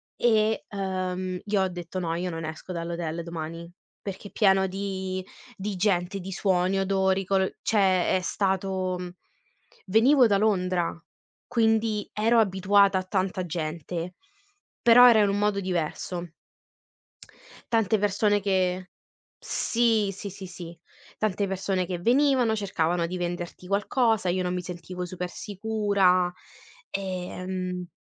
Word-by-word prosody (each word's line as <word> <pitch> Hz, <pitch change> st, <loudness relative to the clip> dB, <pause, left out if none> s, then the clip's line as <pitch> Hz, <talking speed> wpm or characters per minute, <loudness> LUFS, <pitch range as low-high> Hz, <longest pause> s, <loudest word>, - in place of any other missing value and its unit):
e, 220 Hz, -2 st, +2 dB
uhm, 185 Hz, -2 st, -3 dB
io 205 Hz, -2 st, +1 dB
ho 190 Hz, -, +2 dB
detto: 175 Hz, 0 st, -6 dB
"No, 165 Hz, -2 st, -2 dB
io 180 Hz, +2 st, -2 dB
non 165 Hz, -2 st, -5 dB
esco 160 Hz, +3 st, -7 dB
dall'hotel 170 Hz, -1 st, -3 dB
domani. 165 Hz, 0 st, -6 dB, 0.3 s
Perché 200 Hz, 0 st, -7 dB
pieno 190 Hz, -2 st, +3 dB
di 190 Hz, -1 st, -4 dB, 0.3 s
di 200 Hz, +1 st, -4 dB
gente, 180 Hz, 0 st, 0 dB
di 190 Hz, +1 st, -7 dB
suoni, 185 Hz, -1 st, +1 dB
odori, 190 Hz, 0 st, +1 dB
colo" 190 Hz, 0 st, +2 dB
cioè 190 Hz, -4 st, +3 dB
è -, -, 0 dB
stato 190 Hz, -1 st, -1 dB
mhmm, 180 Hz, 0 st, -5 dB, 0.8 s
venivo 245 Hz, +6 st, +5 dB
da 200 Hz, -2 st, +3 dB
Londra 185 Hz, -4 st, +1 dB, 0.5 s
quindi 225 Hz, -2 st, +1 dB
ero 230 Hz, +2 st, +3 dB
abituata 195 Hz, -1 st, +4 dB
a -, -, -4 dB
tanta 185 Hz, -1 st, -1 dB
gente, 170 Hz, +1 st, -4 dB, 0.7 s
però 245 Hz, +1 st, +8 dB
era 220 Hz, -3 st, +6 dB
un 200 Hz, +1 st, 0 dB
modo 205 Hz, -1 st, +1 dB
diverso. 175 Hz, -1 st, -3 dB, 1.4 s
Tante 220 Hz, -1 st, +3 dB
persone 205 Hz, +1 st, +2 dB
che 185 Hz, -2 st, 0 dB, 0.5 s
sì, 225 Hz, -3 st, +1 dB
sì, 200 Hz, +1 st, -7 dB
sì, 190 Hz, 0 st, -9 dB
sì. 170 Hz, -1 st, -10 dB, 0.4 s
Tante 205 Hz, -2 st, 0 dB
persone 190 Hz, -1 st, -1 dB
che 175 Hz, 0 st, -4 dB
venivano, 250 Hz, +1 st, +3 dB
cercavano 175 Hz, -4 st, 0 dB
di 175 Hz, +2 st, -4 dB
venderti 175 Hz, 0 st, -5 dB
qualcosa, 210 Hz, +1 st, +1 dB
io 185 Hz, +1 st, 0 dB
non 180 Hz, 0 st, -1 dB
mi 180 Hz, -, -2 dB
sentivo 180 Hz, +1 st, -6 dB
super 180 Hz, 0 st, -5 dB
sicura, 200 Hz, -3 st, +1 dB, 0.6 s
e, 185 Hz, -2 st, -3 dB
ehm 185 Hz, -1 st, -4 dB
190 Hz, 130 wpm, -26 LUFS, 180-205 Hz, 1.4 s, però